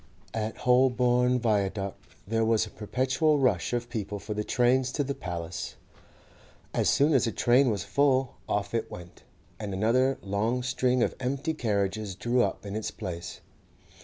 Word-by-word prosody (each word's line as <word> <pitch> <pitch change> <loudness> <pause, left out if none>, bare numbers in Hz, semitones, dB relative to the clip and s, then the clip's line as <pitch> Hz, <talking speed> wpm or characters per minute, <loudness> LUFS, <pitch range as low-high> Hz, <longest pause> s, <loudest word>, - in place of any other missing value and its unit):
At 110 0 -3
Holborn 125 0 +3
Viaduct 100 -4 0 0.3
there 115 +2 0
was 110 0 +2
a 105 - -12
perpetual 130 +7 +1
rush 125 -11 +1
of 120 -1 -2
people 105 -4 -4
for 105 +2 -5
the 105 0 -2
trains 125 +3 +2
to 145 - 0
the 140 0 -2
'Paliss.' 85 - -5 1.0
As - - +2
soon 145 +3 +3
as 130 -3 +3
a - - 0
train 125 +4 +3
was 100 -5 -1
full, 135 -2 +2 0.2
off 100 +1 -1
it 115 - -1
went, 85 0 -11 0.4
and 100 -3 -4
another 130 +7 +2
long 110 +6 -1
string 125 0 +1
of - - 0
empty 135 +5 -1
carriages 105 - -1
drew 120 +5 +1
up 100 -1 -1
in 100 0 -5
its 110 - -2
place. 85 -1 -7
115 Hz, 160 wpm, -28 LUFS, 100-130 Hz, 1.0 s, Holborn